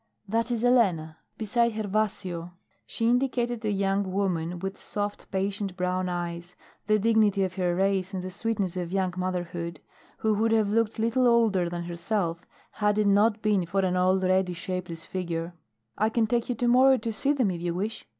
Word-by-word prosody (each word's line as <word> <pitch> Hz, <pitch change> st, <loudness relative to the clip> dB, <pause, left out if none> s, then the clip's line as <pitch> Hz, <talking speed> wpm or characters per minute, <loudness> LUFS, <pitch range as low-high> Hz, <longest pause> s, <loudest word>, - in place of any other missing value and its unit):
"That 230 Hz, +3 st, 0 dB
is 235 Hz, -1 st, -1 dB
Elena 180 Hz, -11 st, +2 dB, 0.2 s
beside 235 Hz, +2 st, +1 dB
Gervasio." 200 Hz, -5 st, -2 dB, 0.3 s
She 225 Hz, -, -1 dB
indicated 245 Hz, -1 st, +1 dB
a 215 Hz, -, 0 dB
young 195 Hz, -1 st, 0 dB
woman 180 Hz, -3 st, -1 dB
with 195 Hz, +2 st, -4 dB
soft, 205 Hz, 0 st, -4 dB
patient, 195 Hz, 0 st, -2 dB
brown 180 Hz, 0 st, -1 dB
eyes, 175 Hz, 0 st, -5 dB, 0.3 s
the 215 Hz, 0 st, +4 dB
dignity 210 Hz, -2 st, +3 dB
of 185 Hz, -1 st, -2 dB
her 180 Hz, -2 st, 0 dB
race 190 Hz, 0 st, +1 dB
and 185 Hz, -2 st, -4 dB
the 185 Hz, -, -5 dB
sweetness 200 Hz, -3 st, -1 dB
of 175 Hz, -2 st, -3 dB
young 190 Hz, -2 st, 0 dB
motherhood, 175 Hz, -2 st, -3 dB, 0.4 s
who 220 Hz, -1 st, +1 dB
would 225 Hz, +2 st, +2 dB
have 215 Hz, -2 st, +2 dB
looked 230 Hz, 0 st, +1 dB
little 230 Hz, +3 st, +2 dB
older 220 Hz, -7 st, +3 dB
than 175 Hz, 0 st, -4 dB
herself 170 Hz, 0 st, -2 dB, 0.3 s
had 210 Hz, 0 st, 0 dB
it 215 Hz, -, +2 dB
not 210 Hz, +2 st, +3 dB
been 210 Hz, -3 st, +2 dB
for 195 Hz, +3 st, +1 dB
an 185 Hz, -1 st, 0 dB
already 185 Hz, 0 st, +2 dB
shapeless 175 Hz, -1 st, -5 dB
figure. 170 Hz, -2 st, -4 dB, 0.5 s
"I 215 Hz, +1 st, +3 dB
can 225 Hz, 0 st, +2 dB
take 235 Hz, +2 st, -1 dB
you 245 Hz, -, 0 dB
to 240 Hz, +2 st, 0 dB
morrow 260 Hz, +2 st, +6 dB
to 225 Hz, 0 st, -4 dB
see 275 Hz, +6 st, +1 dB
them 250 Hz, -9 st, +1 dB
if 170 Hz, -2 st, -5 dB
you 170 Hz, -1 st, -2 dB
wish." 210 Hz, +5 st, -4 dB
195 Hz, 180 wpm, -27 LUFS, 180-220 Hz, 0.5 s, morrow